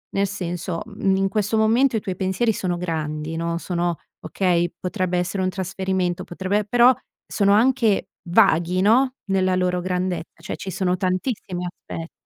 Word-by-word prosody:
Nel 200 0 +2
senso, 180 -2 -4
mhmm, 200 -3 0
in 195 0 +1
questo 210 +1 0
momento 230 +4 +3
i 210 - -2
tuoi 190 -4 -4
pensieri 190 +5 +1
sono 180 -2 -1
grandi, 160 -2 -3
no, 170 0 -1
sono 175 -1 -1 0.3
okay? 175 -3 +1
Potrebbe 180 -1 -1
essere 180 +2 -1
un 185 - +1
trasferimento, 190 -1 -2
potrebbe 190 +4 -1
però 245 +3 +6 0.3
sono 200 -1 +2
anche 225 -4 +3 0.2
vaghi, 180 -2 +4
no, 255 +6 +4 0.2
nella 185 -1 +2
loro 180 -1 +1
grandezza, 180 -3 -3
cioè 170 - -5
ci 195 - -6
sono 180 0 0
tantissimi 185 -1 -2
aspetti 165 -1 -7
185 Hz, 155 wpm, -23 LUFS, 175-205 Hz, 0.3 s, però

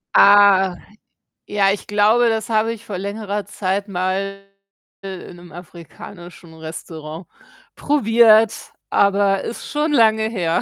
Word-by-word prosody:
Ah, 200 -2 +5 0.7
ja, 200 -1 +1
ich 200 - -5
glaube, 215 +4 +3
das 220 0 -3
habe 225 0 +1
ich 230 0 -9
vor 200 - -6
längerer 205 +1 -5
Zeit 200 +1 -3
mal 195 +1 -3 0.6
i - - -7 0.2
in 175 - -12
'nem 175 -1 -15
afrikanischen 175 0 -13
Restaurant 160 +1 -9 0.5
probiert, 225 -5 +3 0.2
aber 200 -1 +1
ist 235 - -7
schon 300 +2 -1
lange 220 -4 +3
her. 175 -7 -1
200 Hz, 125 wpm, -19 LUFS, 180-220 Hz, 0.7 s, Ah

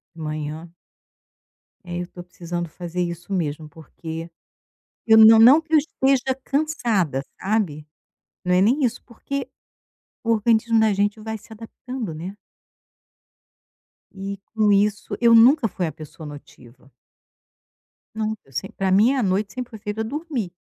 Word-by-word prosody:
Manhã. 155 +1 -5 1.2
É 175 0 -4
eu 175 - -6
tô 175 -1 -11
precisando 175 -1 -6
fazer 175 +2 -5
isso 170 +2 -5
mesmo, 155 -3 -3
porque, 160 +2 -8 0.8
eu 220 0 +7
não 220 0 +9
não 260 +8 +8
que 320 0 -4
eu - - +8
esteja 265 -3 +1
cansada, 235 - 0 0.2
sabe? 190 -8 -1 0.6
Não 180 0 +2
é 180 - +4
nem 255 +8 +3
isso, 245 0 -1
porque, 265 +3 -5 0.8
o 230 - +1
organismo 225 +1 +2
da 220 -2 +3
gente 205 +2 0
vai 220 0 -5
se 215 +2 -20
adaptando, 225 -2 -7
né. 180 +6 -7 1.8
E 195 +1 -5 0.2
com 215 -2 +3
isso 205 0 +1
eu 235 -1 +6
nunca 240 +2 +6
fui 180 -2 -3
a - - -4
pessoa 155 +2 -11
notiva. 135 -3 -14 1.2
Nunca. 215 -10 -4
Semp 190 +9 -5
pra 190 -1 0
mim 220 +8 +5
a 255 - 0
noite 195 +2 0
sempre 250 -1 -6
foi 220 - -9
feita 210 +1 -4
dormir. 270 - -4
205 Hz, 140 wpm, -22 LUFS, 170-230 Hz, 1.8 s, não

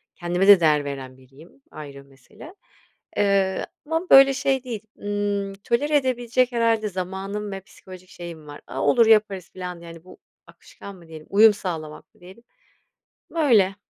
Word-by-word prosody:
Kendime 175 +2 -1
de 200 -3 +9
değer 150 -3 +2
veren 130 -2 -7
biriyim, 140 - -19
ayrı 140 -2 -10
bir 140 - -25
mesele, 135 - -15 0.6
ııı, 195 -2 +1 0.2
ama 325 +4 -3
böyle 270 0 +8
şey 270 -1 -1
değil, 235 -5 -6 0.2
ımm, 205 -1 -3
tolere 290 +5 0
edebilecek 255 -1 0
herhâlde 230 -3 +1
zamanım 195 +3 -5
ve 195 - -5
psikolojik 185 -1 -15
şeyim 170 -3 -10
var. 145 0 -11
"A - - -5
olur 235 -3 +4
yaparız." 210 -4 +2
filan, 180 -2 -8
yani, 165 -1 -12
bu 185 - -15 0.3
akışkan 200 - -13
mı 170 -3 -17
diyelim, 160 -1 -12
uyum 215 +1 +6
sağlamak 165 -1 -7
mı 215 - -28
diyelim. 190 +6 -15 0.9
Böyle. 230 - +3
195 Hz, 155 wpm, -23 LUFS, 170-230 Hz, 0.9 s, de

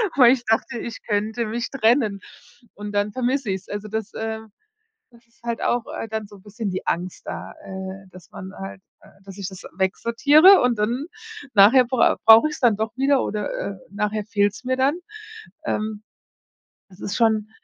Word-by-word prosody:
weil 250 -3 +7
ich 245 -2 -3
dachte, 225 +3 0
ich 235 - -6
könnte 220 +2 -1
mich 230 +2 -3
trennen 225 -5 +2 0.6
und 205 0 -7
dann 205 +1 0
vermisse 255 -1 -1
ich 190 -1 -2
es.“ - - -26
Also, 205 +1 -5
das, 220 0 -4
ähm 220 0 -5 0.6
das 235 0 -22
ist 235 +1 -33
halt 235 -1 -3
auch, 240 -1 0
äh, 225 - -5
dann 220 -1 -4
so 205 0 -15
bisschen 210 +2 -6
die 185 - -5
Angst 180 +1 -3
da, - - -6
äh, 190 0 -7
dass 185 -1 -15
man 190 0 -9
halt, 195 0 -8 0.2
äh - - -19 0.2
dass 195 -1 -11
ich 200 - -4
das 190 -1 -11
wegsortiere 285 - +5
und 245 -3 +1
dann 240 +7 -1 0.5
nachher 220 +6 +7
brau 250 0 +2
brauche 225 +7 +8
ich 300 - -6
es - - -10
dann 235 -5 +4
doch 220 0 -2
wieder 270 0 +2
oder, 210 -1 -3
äh, 200 - -4 0.2
nachher 210 +1 -2
fehlt's 205 +2 0
mir 255 0 0
dann. 280 +6 +2 0.7
Ähm. 215 0 -3 0.9
Das 185 - -17
ist 200 - -4
schon 220 -2 +2
220 Hz, 185 wpm, -22 LUFS, 205-240 Hz, 0.9 s, brauche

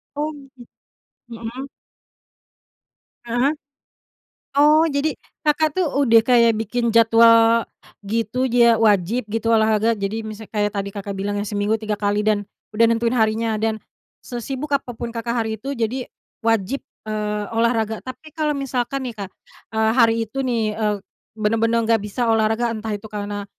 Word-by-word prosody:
Oh, 300 +1 -1
gi 265 -3 -14 0.6
mhm. 235 +3 -7 1.6
Ah 235 0 -3
hah? 310 - -2 1.0
Oh, 300 +2 +6
jadi, 285 +1 0 0.3
Kakak 300 +2 +2
tuh 365 - +2
udah 265 -6 +4
kayak 235 -3 +5
bikin 235 +2 -1
jadwal 230 0 +6 0.4
gitu, 230 +5 -1
dia 235 -1 +5
wajib 210 +2 +2
gitu, 225 +1 0
olahraga. 220 +1 +3
Jadi, 220 +2 -4
misal 215 0 -9
kayak 210 -1 -1
tadi 200 0 -3
Kakak 200 0 -6
bilang 205 +1 -2
ya, 205 - -3
seminggu 205 +2 0
3 215 -1 -2
kali, 205 0 0
dan 210 -1 +2 0.3
udah 230 +2 +5
nentuin 230 +1 +1
harinya, 220 -1 +1
dan 220 0 0 0.5
sesibuk 265 +4 -5
apapun 240 -3 -3
Kakak 235 +1 -2
hari 220 -1 -1
itu, 275 - -5
jadi 235 +3 -2 0.3
wajib, 225 +3 0 0.3
eee, 210 -1 -2
olahraga. 225 -1 +1
Tapi 295 +4 -10
kalau 300 -2 0
misalkan 265 0 -2
nih 240 - -5
Kak, 195 - -7 0.5
eee, 220 0 +3
hari 230 -3 +5
itu 270 +6 -5
nih, 230 -4 0
eee, 210 -1 0 0.4
bener-bener 225 +2 +1
nggak 225 -1 +3
bisa 220 +4 -2
olahraga, 225 +1 +1
entah 220 0 -5
itu 205 - -11
karena 205 -1 -4
225 Hz, 150 wpm, -21 LUFS, 215-245 Hz, 1.6 s, Oh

